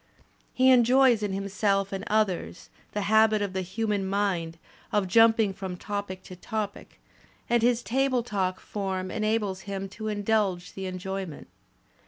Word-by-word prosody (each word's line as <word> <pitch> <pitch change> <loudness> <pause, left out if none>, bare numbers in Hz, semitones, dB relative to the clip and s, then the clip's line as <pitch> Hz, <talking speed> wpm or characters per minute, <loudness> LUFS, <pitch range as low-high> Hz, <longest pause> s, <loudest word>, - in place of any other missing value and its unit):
He 260 +1 +4
enjoys 250 -1 +5
in 205 -2 -1
himself 195 0 0
and 195 0 -4
others 205 -5 -1 0.2
the 210 - -1
habit 220 0 +4
of 200 -2 -3
the 190 - -1
human 205 +2 -2
mind 190 -4 -1 0.3
of 205 -2 +1
jumping 225 0 +5
from 190 -2 -6
topic 200 -2 -5
to 185 - -10
topic, 210 +2 -5 0.5
and 240 -1 +2
his 240 0 +2
table 260 0 +1
talk 190 -5 -2
form 190 -2 -4
enables 215 -3 -1
him 195 0 -3
to 215 +3 -7
indulge 205 -4 0
the 190 -1 -5
enjoyment. 185 -3 -5
200 Hz, 145 wpm, -27 LUFS, 190-220 Hz, 0.5 s, enjoys